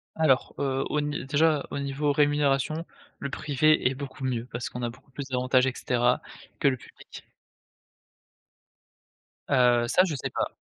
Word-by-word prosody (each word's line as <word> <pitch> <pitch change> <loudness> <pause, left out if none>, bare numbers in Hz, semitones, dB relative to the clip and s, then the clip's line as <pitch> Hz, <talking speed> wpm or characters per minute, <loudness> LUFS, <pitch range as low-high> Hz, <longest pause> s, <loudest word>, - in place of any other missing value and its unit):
Alors, 155 -5 +2
heu, 135 -1 0
au 150 - 0
n 145 -2 -3
déjà 150 +1 +2
au - - -3
niveau 140 +1 -1
rémunération, 145 +2 +1 0.3
le 140 - -4
privé 150 +1 +2
est - - -3
beaucoup 135 0 -8
mieux 120 -3 -1
parce 120 0 -4
qu'on 125 - -7
a 120 - -1
beaucoup 125 +3 -16
plus 140 +1 -6
d'avantages 130 0 +2
et 130 - -1
cetera 125 0 +1 0.4
que - - +3
le 130 -2 +2
public. - - -14 2.2
Heu, 125 -2 +4
ça, 180 - +4
je 165 -5 -2
sais 135 - -4
pas. - - -1
135 Hz, 165 wpm, -27 LUFS, 125-145 Hz, 2.2 s, Heu